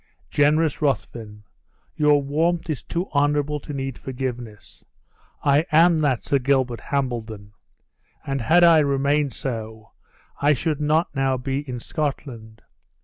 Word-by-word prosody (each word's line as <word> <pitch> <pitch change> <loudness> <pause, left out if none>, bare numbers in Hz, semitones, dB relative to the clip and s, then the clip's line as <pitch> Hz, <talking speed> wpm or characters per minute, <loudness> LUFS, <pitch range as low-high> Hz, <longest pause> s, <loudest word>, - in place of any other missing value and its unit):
"Generous 150 +1 +2
Ruthven, 115 -7 -3 0.5
your 150 -1 +3
warmth 165 +4 0
is 145 - -4
too 175 +3 -4
honorable 145 +1 +1
to 145 - -9
need 135 -2 -5
forgiveness. 125 -5 -7 0.6
I 145 +2 +4
am 165 +1 +5
that 140 -6 0
Sir 140 - +1
Gilbert 130 -2 0
Hambledon; 115 -7 -3 0.7
and 135 -1 -2
had 170 +9 +4
I 165 -2 +7
remained 140 -1 +1
so, 110 -4 -6 0.5
I 145 +1 +4
should 150 +2 -2
not 155 +3 +1
now 135 -1 +1
be 135 +2 -3
in 125 -1 -4
Scotland. 115 -6 -5
140 Hz, 130 wpm, -23 LUFS, 125-150 Hz, 0.7 s, I